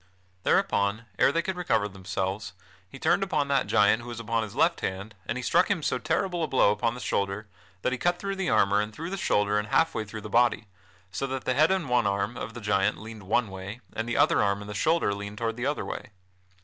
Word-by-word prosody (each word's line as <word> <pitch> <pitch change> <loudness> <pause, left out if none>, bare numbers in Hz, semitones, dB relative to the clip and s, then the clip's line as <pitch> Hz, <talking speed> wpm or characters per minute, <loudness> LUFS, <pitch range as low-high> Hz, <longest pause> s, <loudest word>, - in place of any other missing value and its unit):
Thereupon, 100 +5 +1
ere - - +5
they 170 +3 0
could 190 +1 -2
recover 115 -13 +1
themselves, 95 +1 -4 0.4
he 135 - -10
turned 195 - +2
upon 155 -7 0
that 140 -1 +2
giant 110 +1 +4
who 120 - -10
was 120 -1 -6
upon 115 0 -1
his 110 -3 -6
left - - +2
hand 100 +3 -4
and - - -2
he 125 - -4
struck 180 - +3
him 190 -6 0
so 125 - 0
terrible 175 +6 -1
a - - 0
blow 130 -7 +4
upon 115 +3 0
the - - -7
shoulder 100 -1 -2 0.4
that - - +1
he 130 - -2
cut 175 0 +1
through 195 +1 -3
the 190 -2 -1
armor 100 +1 +3
and 105 +1 -4
through 165 - -6
the - - -1
shoulder 105 - +2
and 105 - -4
half 160 +8 +2
way 110 - -2
through 110 +1 -8
the 105 - -7
body, 115 0 +2 0.5
so 135 - -2
that 130 -1 -4
the 130 - +2
head 155 +4 +4
and 190 -5 0
one 125 -3 +2
arm 100 +3 -1
of 115 -1 -6
the 120 - -7
giant 100 -2 +1
leaned 110 +1 -9
toward 95 - -14
one - - -11
way, 95 +4 -7
and 115 +1 -3
the 120 - -1
other - - +4
arm 100 -1 +1
and 105 - -9
the - - -5
shoulder 155 -1 +2
leaned 100 +1 -6
toward 115 0 -2
the 120 +3 -2
other 145 - -1
way. 130 - -6
115 Hz, 250 wpm, -27 LUFS, 105-135 Hz, 0.5 s, ere